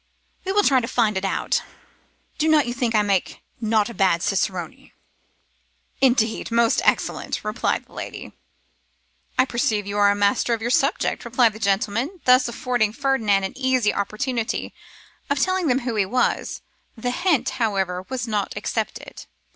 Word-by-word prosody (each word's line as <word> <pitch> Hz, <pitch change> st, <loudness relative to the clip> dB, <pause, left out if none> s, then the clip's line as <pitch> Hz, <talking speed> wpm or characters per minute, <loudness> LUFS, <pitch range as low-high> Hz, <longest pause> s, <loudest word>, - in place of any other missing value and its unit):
'We 385 Hz, -, -1 dB
will 415 Hz, 0 st, +4 dB
try 270 Hz, -7 st, +4 dB
to 230 Hz, -, -4 dB
find 220 Hz, -4 st, +1 dB
it 190 Hz, -, -2 dB
out. 195 Hz, -, 0 dB, 0.8 s
Do 315 Hz, -, +2 dB
not 305 Hz, -2 st, +4 dB
you 240 Hz, -, -3 dB
think 240 Hz, -3 st, -1 dB
I 210 Hz, -, +4 dB
make 195 Hz, -3 st, -1 dB, 0.2 s
not 220 Hz, -2 st, +1 dB
a 235 Hz, -, -7 dB
bad 185 Hz, -5 st, +2 dB
cicerone?' 185 Hz, -4 st, -2 dB, 1.1 s
'Indeed, 240 Hz, -4 st, +2 dB
most 230 Hz, 0 st, +2 dB
excellent,' -, -, 0 dB
replied 215 Hz, +2 st, -1 dB
the -, -, -23 dB
lady. -, -, -7 dB, 1.1 s
'I 255 Hz, -, +5 dB
perceive 225 Hz, -5 st, 0 dB
you 200 Hz, +1 st, -3 dB
are 205 Hz, 0 st, +5 dB
a 200 Hz, -, +2 dB
master 205 Hz, +3 st, +2 dB
of -, -, -8 dB
your 240 Hz, -, -1 dB
subject,' 275 Hz, +5 st, +1 dB
replied 235 Hz, -2 st, +2 dB
the 220 Hz, -, -10 dB
gentleman, 220 Hz, -, -1 dB
thus 255 Hz, 0 st, +5 dB
affording 235 Hz, -2 st, -1 dB
Ferdinand 230 Hz, -7 st, +1 dB
an 190 Hz, -, -4 dB
easy 260 Hz, -4 st, +1 dB
opportunity 220 Hz, +3 st, -2 dB, 0.6 s
of 280 Hz, -, +1 dB
telling 370 Hz, +4 st, +1 dB
them 260 Hz, 0 st, +2 dB
who 240 Hz, -1 st, -3 dB
he 210 Hz, -3 st, +1 dB
was. 250 Hz, +5 st, -1 dB, 0.3 s
The 245 Hz, +2 st, -2 dB
hint, 335 Hz, 0 st, +1 dB
however, 190 Hz, -4 st, 0 dB
was 255 Hz, -2 st, -3 dB
not 210 Hz, -3 st, -2 dB
accepted. -, -, -4 dB
230 Hz, 165 wpm, -23 LUFS, 205-255 Hz, 1.1 s, I